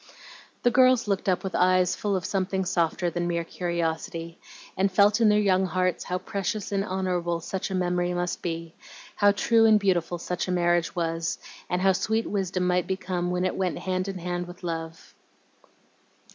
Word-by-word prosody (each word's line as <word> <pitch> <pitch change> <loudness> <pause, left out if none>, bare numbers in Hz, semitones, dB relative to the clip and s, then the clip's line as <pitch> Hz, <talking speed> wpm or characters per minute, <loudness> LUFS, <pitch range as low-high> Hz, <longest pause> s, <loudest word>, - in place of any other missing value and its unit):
The 245 - +4
girls 255 -2 +4
looked 195 -1 0
up 180 - +1
with 190 -2 -4
eyes 185 0 +3
full 205 -2 -1
of 185 -2 -2
something 190 -1 -1
softer 175 0 0
than 175 +1 -2
mere 170 -1 -1
curiosity, 165 -1 -3 0.4
and 195 +1 +1
felt 205 +4 +4
in 220 - +6
their 210 - +4
young 190 -2 +3
hearts 185 -1 -1
how 180 - -1
precious 200 +3 -3
and 195 -1 0
honorable 180 -3 -1
such 185 +3 -4
a 190 - -2
memory 180 -1 0
must 175 0 -2
be, 165 -1 -4 0.4
how 205 0 +5
true 225 +2 +3
and 215 -1 +6
beautiful 180 -3 0
such 180 +1 -3
a - - -1
marriage 175 0 +1
was, 165 -1 -1 0.3
and 180 0 0
how 195 - +5
sweet 220 +4 0
wisdom 190 -2 -1
might 180 0 +1
become 185 -2 -2
when 180 +1 0
it 185 - -1
went 185 -2 -1
hand 185 0 -2
in 195 -1 -4
hand 175 0 -3
with 175 +1 -12
love. 165 -1 -6
180 Hz, 185 wpm, -26 LUFS, 175-195 Hz, 0.4 s, in